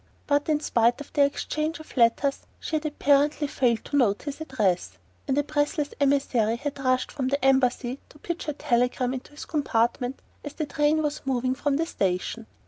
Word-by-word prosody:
But 285 +1 +1
in 300 -1 +3
spite 235 -2 +2
of 290 - -10
their 285 -2 +5
exchange 305 +3 -3
of 315 - -13
letters 260 +3 +2
she 320 - -3
had 305 0 -3
apparently 295 0 +2
failed 245 -5 0
to - - -4
note 215 -7 +2
his 290 +1 -6
address, 190 - -1 0.3
and 265 - +1
a 290 - +3
breathless 290 0 -1
emissary 270 -6 +2
had 280 +3 -5
rushed 255 -1 +1
from 260 -2 -2
the 275 0 0
Embassy 260 -1 +2
to - - -17
pitch 345 +3 -5
her 300 - -2
telegram 250 -2 0
into 260 - -6
his 295 - -8
compartment 245 -3 0 0.2
as 290 - -6
the 310 - -3
train 295 +2 +1
was 300 0 -2
moving 255 -1 0
from 280 +1 0
the 325 +3 +1
station. 200 - -2
275 Hz, 190 wpm, -26 LUFS, 245-295 Hz, 0.3 s, their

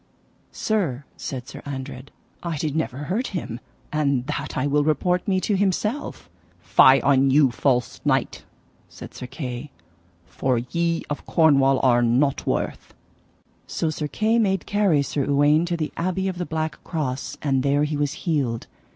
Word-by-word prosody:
Sir, 170 - -1
said 130 -2 -6
Sir - - -9
Andred, 135 -1 -7 0.3
I 170 -3 -3
did 150 0 -2
never 160 -5 -1
hurt 210 - -1
him, 120 -8 -5 0.3
and 140 -4 +1
that 145 +3 -4
I 130 - +1
will 145 +1 +2
report 175 +4 +1
me 190 -2 +2
to 205 - +1
himself. 205 - -1 0.3
Fie 100 +9 +6
on 135 -1 +4
you 135 -1 +5
false 125 0 0
knight, - - 0 0.5
said - - -11
Sir 125 - -7
Kay, 125 0 -6 0.6
for 130 -2 -1
ye 165 +7 -1
of 145 - -5
Cornwall 135 -5 +4
are 120 -2 +4
nought 125 +4 +1
worth. - - -2 0.7
So 160 - -1
Sir 150 -1 -3
Kay 220 +9 +1
made 195 -4 +1
carry 200 -8 +2
Sir 140 -1 -2
Uwaine 145 +4 +3
to 170 -1 -1
the 155 -2 -3
Abbey 185 +2 -1
of 185 -2 -3
the 180 - -3
Black 160 0 -3
Cross, 140 -6 -3
and 135 -3 +2
there 140 +2 +2
he 150 0 -1
was 145 0 0
healed. 135 -9 0
145 Hz, 160 wpm, -23 LUFS, 135-170 Hz, 0.7 s, Fie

